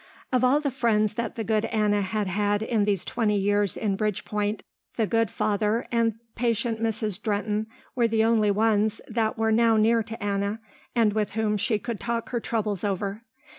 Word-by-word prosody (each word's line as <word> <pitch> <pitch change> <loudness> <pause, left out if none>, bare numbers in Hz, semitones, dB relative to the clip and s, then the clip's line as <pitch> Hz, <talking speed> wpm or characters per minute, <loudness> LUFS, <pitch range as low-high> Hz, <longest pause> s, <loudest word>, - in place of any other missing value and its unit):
Of 255 -1 +3
all 260 +4 +4
the 290 -2 -1
friends 220 -5 +1
that 235 +2 -3
the 225 - -3
good 220 0 +1
Anna 210 -2 +1
had 205 +2 -1
had 205 +2 0
in 220 -2 +1
these 200 -4 0
twenty 215 -3 0
years 205 0 +1
in 205 -3 0
Bridgepoint, 210 0 -2 0.3
the 225 - +1
good 225 0 +1
father 210 +5 0
and 230 -2 +2 0.2
patient 230 -1 -1
Mrs. 215 -3 -1
Drehten 210 0 -1 0.3
were 240 -2 +2
the 220 -1 +2
only 220 -2 +3
ones 215 +1 +2
that 225 +1 -1
were 225 0 +1
now 225 0 +4
near 225 +2 +4
to 225 0 -7
Anna 200 +1 -1 0.4
and 225 -3 +3
with 215 -1 -1
whom 215 -1 0
she 210 +2 +1
could 215 +1 -5
talk 235 -1 -3
her 240 - -1
troubles 215 -5 -2
over. 200 +1 -2
215 Hz, 185 wpm, -26 LUFS, 205-230 Hz, 0.4 s, all